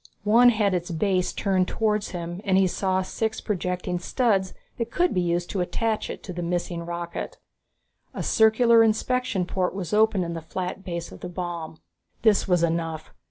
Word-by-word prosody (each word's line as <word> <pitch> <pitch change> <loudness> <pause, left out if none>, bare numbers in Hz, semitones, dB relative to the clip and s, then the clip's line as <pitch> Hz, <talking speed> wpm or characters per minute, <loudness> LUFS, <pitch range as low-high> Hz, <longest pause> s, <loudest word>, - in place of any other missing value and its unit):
One 235 +4 +6
had 210 -4 +2
its 175 0 -2
base 180 +2 0
turned 185 -2 +1
towards 215 -2 0
him, 175 +1 -5
and 190 -2 +2
he 195 - +5
saw 185 +1 0
six 220 +3 -2
projecting 180 -2 -2
studs 195 -2 0 0.2
that 230 -1 -2
could 355 +8 +1
be 180 - +1
used 175 0 -1
to 195 - -1
attach 220 +4 -1
it - - -7
to 185 - -6
the 175 - -4
missing 175 0 -2
rocket. 170 0 -5 0.7
A - - -5
circular 230 +1 +5
inspection 225 -2 +1
port 185 0 -1
was 195 -1 -4
open 210 -3 +3
in 170 0 -4
the 165 - -5
flat 180 +4 -5
base 170 -2 -5
of - - -11
the 180 - -6
bomb. 170 -3 -5 0.5
This 215 -3 +4
was 175 -2 +3
enough. 165 -1 -2
185 Hz, 180 wpm, -25 LUFS, 175-215 Hz, 0.7 s, One